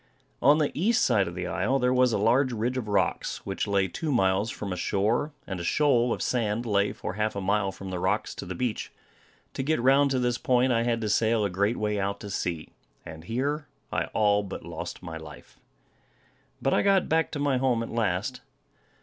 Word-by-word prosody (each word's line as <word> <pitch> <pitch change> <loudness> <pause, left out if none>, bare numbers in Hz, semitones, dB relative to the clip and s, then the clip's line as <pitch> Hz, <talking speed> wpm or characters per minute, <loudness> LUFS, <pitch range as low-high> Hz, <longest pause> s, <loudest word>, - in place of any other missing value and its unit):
On 145 +4 +6
the 150 -2 +1
East 220 +9 +2
side 100 -3 +3
of 85 - -6
the 90 -1 -3
isle, 95 +9 0
there 125 -1 +2
was 125 -1 +4
a - - +1
large 130 +6 +3
ridge 120 +2 -1
of 125 -4 -3
rocks, 105 - -1
which 95 +2 -2
lay 100 -1 +2
two 155 - -3
miles 95 -3 +2
from 100 -3 -5
the - - -1
shore; 110 - 0
and 95 -2 -5
a - - -4
shoal 125 - +2
of - - -1
sand 115 -1 -1
lay 100 -2 +2
for - - -5
half 105 +1 -1
a - - -2
mile 100 0 +1
from 95 0 -8
the 90 - -3
rocks 100 +4 0
to - - -8
the 90 - -5
beach. 120 +2 -3 0.6
To - - -3
get 155 +2 +1
round 135 +3 +4
to 135 - 0
this 125 -1 0
point, 130 -3 +2
I 115 0 +1
had 115 -1 0
to 110 - -1
sail 110 +1 +2
a 100 - -2
great 100 +5 +1
way 105 -1 -1
out 100 +1 -2
to 100 - -7
sea; 85 -5 -3 0.4
and 80 0 -10
here 145 - -2 0.3
I - - 0
all 105 -1 +2
but 100 - -7
lost - - -7
my 80 -2 -6
life. 80 - -12 1.0
But 135 - +2
I - - +3
got 195 -2 +3
back 160 +1 +2
to 145 - -3
my 140 -2 +1
home 125 -3 +1
at - - -7
last. 110 +2 -1
110 Hz, 220 wpm, -27 LUFS, 100-130 Hz, 1.0 s, On